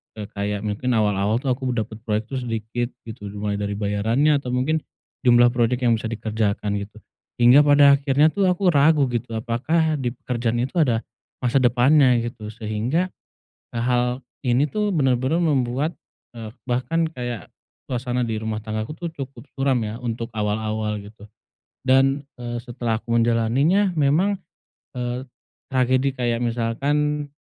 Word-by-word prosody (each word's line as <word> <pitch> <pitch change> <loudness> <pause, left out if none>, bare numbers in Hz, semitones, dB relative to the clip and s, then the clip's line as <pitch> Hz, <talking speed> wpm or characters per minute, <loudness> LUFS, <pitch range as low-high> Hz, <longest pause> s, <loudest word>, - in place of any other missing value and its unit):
eee, 105 -2 -6
kayak 100 0 -3
mungkin 115 +4 -1
awal-awal 105 0 +2
tuh 135 - +1
aku 125 0 -1
dapat 110 -1 -3
proyek 110 +1 -1
tuh 130 - -2
sedikit 120 0 -3 0.2
gitu 110 -2 -8
dimulai 100 0 -3
dari 100 0 -2
bayarannya 110 +9 +2
atau 125 -2 -5
mungkin 150 +5 +1 0.5
jumlah 120 0 +6
project 125 +1 +1
yang 120 -1 +4
bisa 115 - -4
dikerjakan 110 -2 -1
gitu, 100 +1 -8 0.5
hingga 120 +4 +8
pada 145 -1 +7
akhirnya 140 +2 +3
tuh 200 -1 +1
aku 180 0 +3
ragu 150 0 +4
gitu 120 -1 -3
apakah 150 +8 0
di 120 -2 -2
pekerjaan 120 -2 -2
itu 135 +7 -4
ada, 120 -7 +2 0.4
masa 125 +2 +3
depannya 125 +2 +4
gitu 115 -2 -6
sehingga, 115 - -1 0.6
eee, 115 - -1
hal 125 +1 0 0.2
ini 125 +4 +3
tuh 210 -1 0
benar-benar 135 +2 +2
membuat, 140 0 +1 0.4
eee, 115 -1 -7 0.2
bahkan 130 +7 0
kayak 120 - -6 0.4
suasana 125 0 -1
di 115 -2 -2
rumah 110 0 -3
tangga 110 0 -3
aku 150 - -6
tuh 170 +1 -5
cukup 135 -4 -8
suram 135 -3 +2
ya, 110 +1 -4
untuk 115 -1 -4
awal-awal 110 0 -1
gitu, 105 0 -13 0.6
dan, 135 +2 +3 0.2
eee, 120 0 -3
setelah 120 -2 -3
aku 115 +1 -3
menjalaninya 120 - +2
memang, 160 +7 +2 0.6
eee, 125 0 -3 0.5
tragedi 130 +1 +2
kayak 120 -2 0
misalkan 145 +6 0
120 Hz, 150 wpm, -23 LUFS, 110-140 Hz, 0.6 s, hingga